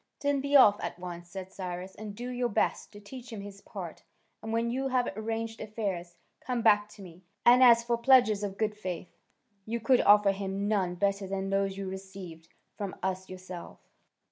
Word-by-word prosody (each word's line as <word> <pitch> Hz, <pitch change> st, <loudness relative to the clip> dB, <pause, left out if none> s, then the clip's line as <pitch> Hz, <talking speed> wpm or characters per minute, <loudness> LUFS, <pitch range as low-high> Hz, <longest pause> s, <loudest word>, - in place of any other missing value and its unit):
"Then 285 Hz, -1 st, +1 dB
be 280 Hz, +1 st, 0 dB
off 210 Hz, -7 st, +7 dB
at -, -, -4 dB
once," 175 Hz, -1 st, -8 dB
said 190 Hz, +1 st, -8 dB
Cyrus, 185 Hz, 0 st, -6 dB
"and 210 Hz, -1 st, -8 dB
do 245 Hz, +3 st, -5 dB
your 245 Hz, -1 st, -1 dB
best 205 Hz, -, 0 dB
to 205 Hz, -, -12 dB
teach 245 Hz, +4 st, -10 dB
him 215 Hz, -3 st, -6 dB
his 200 Hz, 0 st, -10 dB
part, 180 Hz, -6 st, -8 dB, 0.4 s
and 220 Hz, -, -5 dB
when 230 Hz, +1 st, 0 dB
you 265 Hz, +2 st, -1 dB
have 255 Hz, -2 st, +1 dB
arranged 225 Hz, +1 st, -4 dB
affairs, 200 Hz, -5 st, -4 dB, 0.2 s
come 245 Hz, -3 st, -3 dB
back 210 Hz, -1 st, +4 dB
to 200 Hz, -, -12 dB
me; 175 Hz, -1 st, -13 dB, 0.2 s
and 245 Hz, +2 st, +7 dB
as 235 Hz, -2 st, +7 dB
for 235 Hz, 0 st, 0 dB
pledges 235 Hz, -5 st, +5 dB
of 195 Hz, -1 st, -4 dB
good 215 Hz, 0 st, 0 dB
faith, 185 Hz, -4 st, -6 dB, 0.5 s
you 230 Hz, +3 st, -3 dB
could 255 Hz, +2 st, +4 dB
offer 205 Hz, -1 st, +6 dB
him 195 Hz, +1 st, -3 dB
none 190 Hz, -4 st, 0 dB
better 200 Hz, +1 st, 0 dB
than 195 Hz, 0 st, -3 dB
those 195 Hz, 0 st, 0 dB
you 195 Hz, -1 st, -4 dB
received 190 Hz, -4 st, -8 dB, 0.3 s
from 200 Hz, -3 st, -5 dB
us 190 Hz, 0 st, -2 dB
yourself." 185 Hz, -1 st, -9 dB
205 Hz, 195 wpm, -29 LUFS, 190-230 Hz, 0.5 s, off